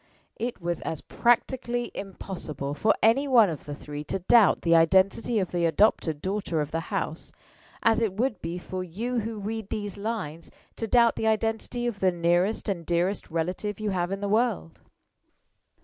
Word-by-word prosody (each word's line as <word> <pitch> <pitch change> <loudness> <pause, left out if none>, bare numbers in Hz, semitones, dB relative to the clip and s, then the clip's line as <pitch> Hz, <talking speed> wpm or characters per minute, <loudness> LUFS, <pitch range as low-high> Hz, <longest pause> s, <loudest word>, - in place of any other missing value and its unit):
It 240 +1 -3
was 170 -1 -3
as 160 - -3
practically 240 0 0
impossible 175 -8 -5
for 180 +9 +2
any 245 +6 +4
one 230 -8 +5
of 155 - -7
the 145 - -5
three 145 0 -7
to - - -2
doubt 205 +3 +4
the 170 -1 +4
identity 190 +7 +3
of 190 -3 0
the 175 -1 +1
adopted 160 -4 +2
daughter 190 -4 -1
of 150 0 -2
the 165 - -1
house - - -3 0.5
as 230 0 +4
it 220 -4 +1
would 225 0 -1
be 165 +2 -4
for 185 +1 -5
you 230 +8 -3
who 225 0 -4
read 215 0 -5
these 205 -2 -4
lines 200 -7 -4 0.3
to 225 - -3
doubt 235 +1 +4
the 220 - 0
identity 225 +2 -1
of 235 -4 -2
the 190 -1 +3
nearest 175 +4 +1
and 185 -5 -2
dearest 175 +4 -1
relative 180 +6 -3
you 215 -1 -1
have 180 -1 -1
in 195 +1 -3
the 205 - -1
world. 215 -5 0
195 Hz, 180 wpm, -26 LUFS, 170-225 Hz, 0.5 s, one